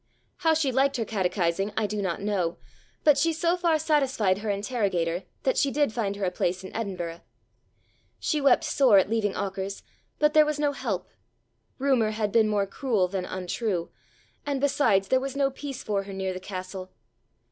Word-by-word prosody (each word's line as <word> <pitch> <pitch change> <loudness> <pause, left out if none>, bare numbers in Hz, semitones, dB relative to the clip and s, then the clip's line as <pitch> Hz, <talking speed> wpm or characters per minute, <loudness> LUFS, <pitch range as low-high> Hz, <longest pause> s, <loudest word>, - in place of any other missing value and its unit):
How 320 -2 +3
she 300 -4 +1
liked 270 +2 +2
her 225 - -1
catechizing 190 -1 0
I 220 - +2
do 210 0 -2
not 190 0 -2
know, 185 -5 -1 0.5
but 295 -2 +5
she 330 - +3
so 335 +2 +1
far 340 -3 +2
satisfied 270 -11 +1
her 215 0 -4
interrogator 195 -5 -1 0.2
that 260 - +2
she 280 - +3
did 290 -4 +1
find 205 -4 -1
her 200 -1 -2
a 180 - 0
place 180 +1 -1
in 190 - -9
Edinburgh. 180 -6 -4 1.0
She 305 -2 -1
wept 280 +3 +4
sore 270 -8 +4
at 195 +2 +3
leaving 210 -3 0
Auchars, 195 0 -4 0.3
but 300 0 +3
there 310 - +7
was 300 0 -1
no 295 -1 +2
help: 280 - -3 0.7
rumour 260 -5 +2
had 215 -1 -1
been 220 -1 +4
more 205 -2 +1
cruel 205 -2 0
than 185 0 -3
untrue, 185 0 -3 0.5
and 285 -2 -2
besides 265 -9 +2
there 260 - +4
was 270 +1 -4
no 275 -1 +2
peace 270 -1 -7
for 205 -2 0
her 195 0 -8
near 190 -1 -2
the 185 - -6
castle. 185 0 -7
215 Hz, 185 wpm, -26 LUFS, 190-275 Hz, 1.0 s, there